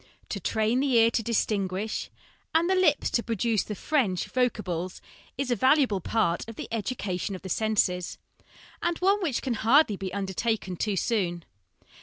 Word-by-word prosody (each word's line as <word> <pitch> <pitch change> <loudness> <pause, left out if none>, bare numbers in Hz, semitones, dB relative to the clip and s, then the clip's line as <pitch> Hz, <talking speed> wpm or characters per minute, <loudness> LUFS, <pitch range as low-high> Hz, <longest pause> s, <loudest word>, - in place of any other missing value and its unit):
To 200 - -3
train 220 +6 +1
the 275 -1 +1
ear 230 0 +6
to 230 - 0
distinguish 210 -2 -1 0.5
and 330 +1 +4
the 380 - +3
lips 370 -5 +3
to 235 - +2
produce 225 -2 0
the 210 - -5
French 215 - 0
voc 250 -1 +2
ables 180 -3 -4 0.4
is 270 -1 -2
a - - +3
valuable 260 -4 +3
part 175 -3 0
of 225 - -8
the - - -6
education 205 -4 -2
of 185 - -10
the 190 - -6
senses, 185 -4 0 0.6
and 345 -1 0
one 395 +3 +2
which 300 -9 -1
can 255 - 0
hardly 230 0 +4
be 190 -1 -5
undertaken 195 0 -2
too 205 +3 -1
soon. 180 -5 -1
220 Hz, 170 wpm, -27 LUFS, 190-255 Hz, 0.6 s, ear